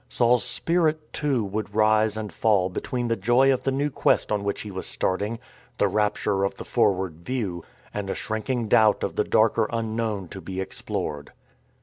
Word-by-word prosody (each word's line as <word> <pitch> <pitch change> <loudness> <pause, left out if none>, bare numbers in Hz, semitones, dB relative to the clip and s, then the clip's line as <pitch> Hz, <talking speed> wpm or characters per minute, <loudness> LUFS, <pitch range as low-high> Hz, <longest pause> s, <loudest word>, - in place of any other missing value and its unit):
Saul's 120 0 +3
spirit, 155 +4 0
too, 140 -6 0
would 105 +1 -4
rise 110 0 +3
and 105 -4 -5
fall 100 -3 +2
between 120 +6 -3
the 115 - +1
joy 120 +6 +4
of 130 - -2
the 135 - +1
new 145 +2 0
quest - - +2
on 105 -1 0
which 100 0 -2
he 105 - -7
was 95 0 -5
starting, 100 +5 -1 0.4
"the - - +3
rapture 105 -2 0
of 100 - -1
the - - -8
forward 95 -5 +1
view," 100 -9 -3 0.3
and 100 -2 -4
a - - -1
shrinking 115 +2 -2
doubt 110 0 +4
of - - -2
the - - +2
darker 110 0 +2
unknown 110 -4 -2
to 95 - -8
be 95 +2 -6
explored. 75 -5 -4
110 Hz, 185 wpm, -25 LUFS, 100-120 Hz, 0.4 s, joy